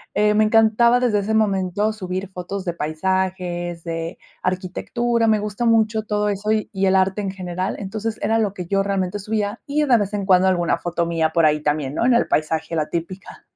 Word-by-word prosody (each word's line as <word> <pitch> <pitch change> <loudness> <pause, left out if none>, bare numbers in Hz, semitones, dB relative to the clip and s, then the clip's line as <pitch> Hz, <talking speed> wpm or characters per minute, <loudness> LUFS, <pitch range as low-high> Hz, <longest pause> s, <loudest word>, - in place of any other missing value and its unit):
eh, 210 0 +3
me 215 +1 +4
encantaba 225 +2 +4
desde 235 -5 +2
ese 215 +2 -1
momento 205 0 +1
subir 185 -2 -5
fotos 185 +2 -6
de 175 - -1
paisajes, 175 +1 -2
de 165 +1 -4 0.2
arquitectura, 225 +6 -1
me 215 -1 +3
gusta 210 +3 -3
mucho 220 -1 +2
todo 210 -1 0
eso 205 +1 -1
y 215 -1 0
y 195 -1 +1
el 190 - +3
arte 190 +2 +2
en 195 - -2
general, 185 0 -4
entonces 215 +2 -4
era 225 +1 +1
lo 210 -3 0
que 180 -3 -6
yo 195 +3 +1
realmente 195 0 -1
subía 210 +1 -2
y 295 +1 +1
de 250 -4 +5
vez 205 -1 -2
en 200 -1 -2
cuando 190 -1 +4
alguna 175 -2 +1
foto 170 -1 -1
mía 165 -2 0
por 165 -1 +4
ahí 150 0 +2
también, 150 -2 -1
¿no?, - - 0
en 255 - +4
el 235 - +2
paisaje, 160 +2 -1
la 155 -2 -1
típica. 180 +4 -6
195 Hz, 210 wpm, -21 LUFS, 175-215 Hz, 0.2 s, de